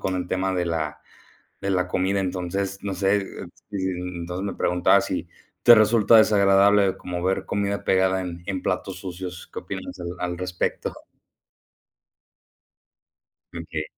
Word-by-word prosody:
con 95 - -1
el 90 - -3
tema 95 +1 -1
de 90 -1 0
la 80 -3 -3 0.6
de 100 - -2
la 90 -1 +1
comida, 95 +2 0
entonces, 95 +1 -2
no 100 -2 -3
sé, 100 +1 +1 0.5
mm, 90 -3 -3
entonces 90 +3 -4
me 100 - -3
preguntaba 90 0 +3
si - - -3 0.3
te 120 - +9
resulta 110 0 +5
desagradable 100 -2 +5
como 90 -1 -5
ver 95 +1 0
comida 100 0 -2
pegada 95 0 +2
en 85 -1 -6
en 95 -2 -3
platos 90 +1 -2
sucios, 90 -1 -7
¿qué - - -5
opinas - - -7
al 85 - -4
al 90 -1 -3
respecto? 90 -1 -2 2.6
Okey. 80 -2 -5
95 Hz, 140 wpm, -24 LUFS, 90-100 Hz, 2.6 s, te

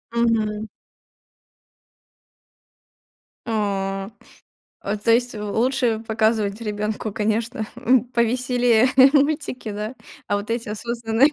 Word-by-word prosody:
Мгм. 220 -2 +1 2.8
А. 195 -3 -2 0.9
То 230 - +4
есть, 240 +1 +2
э, 210 - -6
лучше 235 +2 +1
показывать 220 -1 +1
ребёнку, 210 0 -3
конечно, 220 +3 -1
м, 250 -1 +3
повеселее 245 0 +2 0.3
мультики, 285 -5 0
да. 210 +4 -5 0.3
А 205 - +1
вот 205 +2 -6
эти 230 -1 -2
осознанные. 235 +4 +1
225 Hz, 90 wpm, -22 LUFS, 210-245 Hz, 2.8 s, То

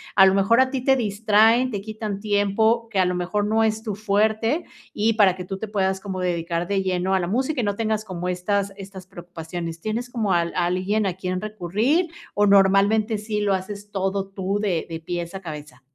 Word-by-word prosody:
a 195 - +8
lo 190 - +3
mejor 195 +5 +4
a 260 0 +4
ti 265 -1 -3
te 270 - +5
distraen, 225 +2 +3
te 205 -3 -3
quitan 215 -1 -5
tiempo, 215 +3 +1
que 200 - -1
a 185 - +4
lo 180 0 0
mejor 185 +4 -1
no 220 +1 +2
es 220 0 0
tu 215 -3 -4
fuerte, 220 - +1 0.3
y 220 +2 +1
para 200 -4 +4
que 180 -1 -7
tú 190 +1 -5
te 220 - -5
puedas 190 -2 0
como 190 -1 -5
dedicar 170 -1 -2
de 195 0 0
lleno 185 0 0
a - - +2
la 175 - -2
música 260 - -1
y - - -2
no 205 -1 0
tengas 215 0 -1
como 180 -2 -4
estas 200 +2 -1
estas 195 -2 -10
preocupaciones. 170 -2 -7
¿Tienes 230 +4 -3
como 220 -5 -1
al 170 -1 +1
alguien 185 +4 0
a 180 - -2
quien 185 0 -3
recurrir 215 - 0 0.3
o 205 - +3
normalmente 200 +3 +4
sí 210 0 -3
lo 200 -2 +2
haces 200 +2 -7
todo 195 0 -2
tú 195 +1 -2
de 205 -4 0
de 165 0 -4
pies 170 +1 -5
a 195 - -5
cabeza? 150 -7 -9
200 Hz, 215 wpm, -23 LUFS, 185-215 Hz, 0.3 s, a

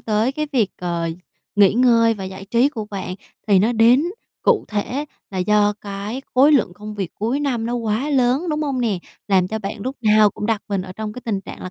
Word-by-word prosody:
tới 220 +4 0
cái 305 +2 -2
việc, 220 -7 +2
ờ, 170 -2 -2 0.5
nghỉ 200 -2 +6
ngơi 230 -2 +4
và 195 -2 -6
giải 190 +1 -7
trí 235 +7 +3
của 225 -7 -5
bạn, 190 -2 -4 0.3
thì 200 - +6
nó 215 +6 +2
đến 235 +5 +5 0.4
cụ 475 -3 +3
thể 240 +7 -2 0.3
là 190 - -4
do 205 +2 +3
cái 205 +5 -5
khối 280 +4 +6
lượng 225 -10 +3
công 210 +1 -8
việc 195 -4 -3
cuối 235 +7 -1
năm 245 -6 -1
nó 240 - -2
quá 230 +5 -1
lớn, 265 +5 +2
đúng 305 0 -1
hông 275 -3 -1
nè? 215 -6 0 0.3
Làm 185 -2 +3
cho 220 - -3
bạn 205 0 -6
lúc 260 +6 -4
nào 215 -2 +5
cũng 210 - -5
đặt 225 -3 0
mình 195 -2 -1
ở 185 0 -8
trong 215 +1 -5
cái 250 - -9
tình 205 -4 -1
trạng - - -10
là 185 - -6
220 Hz, 230 wpm, -21 LUFS, 200-250 Hz, 0.5 s, nghỉ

